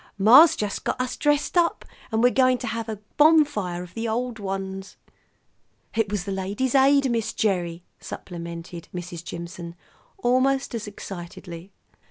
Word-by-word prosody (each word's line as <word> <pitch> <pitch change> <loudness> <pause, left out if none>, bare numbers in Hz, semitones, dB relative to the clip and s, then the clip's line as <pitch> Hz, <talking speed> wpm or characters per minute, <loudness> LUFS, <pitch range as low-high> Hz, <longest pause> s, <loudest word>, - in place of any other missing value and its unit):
"Ma's 265 +11 +8
just 210 -6 -3
got - - -2
us 255 -1 -2
dressed 295 +2 +1
up, 345 -1 +2 0.3
and 225 +1 +1
we're 245 - +6
going 255 -1 +3
to - - -6
have 230 0 -3
a 215 - -4 0.2
bonfire 290 - +3
of 180 0 -13
the 230 0 -3
old 235 +1 -2
ones." 195 -1 -5 1.0
"It 225 -3 0
was 205 -4 -1
the 200 - -5
Ladies' 200 +7 -2
Aid, 275 -1 +4
Miss 230 -2 -1
Gerry," 175 -5 -1 0.2
supplemented 170 -1 -8
Mrs. 175 -1 -6
Jimson 170 0 -7 0.4
almost 265 -2 +1
as 220 -2 -4
excitedly. 175 -2 -9
210 Hz, 150 wpm, -24 LUFS, 180-255 Hz, 1.0 s, Ma's